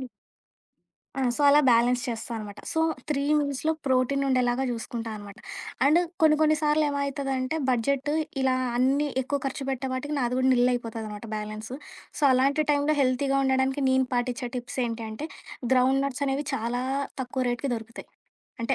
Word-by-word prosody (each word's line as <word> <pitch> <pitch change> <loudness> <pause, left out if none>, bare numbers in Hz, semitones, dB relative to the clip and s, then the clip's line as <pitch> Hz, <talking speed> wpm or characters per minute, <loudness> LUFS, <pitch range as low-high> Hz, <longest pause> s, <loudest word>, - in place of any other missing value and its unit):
హ్మ్. 260 - -6 1.1
ఆ! - - +1
సో - - -5
అలా 290 +1 +7
బ్యాలెన్స్ 245 +2 +3
చేస్తా 230 +1 -4
అనమాట. 210 -1 -7
సో 320 - 0 0.3
3 280 -2 0 0.2
మీల్స్‌లో 285 +2 -1
ప్రోటీన్ 260 +2 +2
ఉండేలాగా 255 0 +2
చూసుకుంటానమాట. 225 -3 -6 0.5
అండ్ 305 +5 +5 0.2
కొన్ని 310 -1 +5
కొన్ని 310 0 +4
సార్లు 300 +1 +3
ఏమయితదంటే, 275 -1 -2
బడ్జెట్ 265 +4 +1 0.3
ఇలా 260 -1 +3 0.2
అన్నీ 270 +4 +2 0.2
ఎక్కువ 280 +2 -1
ఖర్చు 270 +1 -4
పెట్టే 265 0 -2
పాటికి, 290 +4 -3
నాది 250 -1 0
కూడా 260 0 +3
నిల్ 245 0 +4
అయిపోతదనమాట 225 -2 -5
బ్యాలెన్సు. 215 +3 -6 0.4
సో 300 - -8
అలాంటి 275 +4 +3
టైంలో 290 +1 +2
హెల్తీగా 270 +1 +2
ఉండడానికి 265 +1 +1
నేను 260 0 +3
పాటిిచ్చే 245 0 -1
టిప్స్ 245 +2 -6
ఏంటి 230 0 -4
అంటే 220 +8 -5 0.5
గ్రౌండ్ 260 +1 +4
నట్స్ 275 0 -4
అనేవి 275 +2 -1
చాలా 235 +2 -2 0.4
తక్కువ 255 +1 -3
రేట్‌కి 250 +2 -2
దొరుకుతాయి. 225 +1 -10 0.5
అంటే 265 +3 +1
260 Hz, 155 wpm, -26 LUFS, 240-280 Hz, 1.1 s, అలా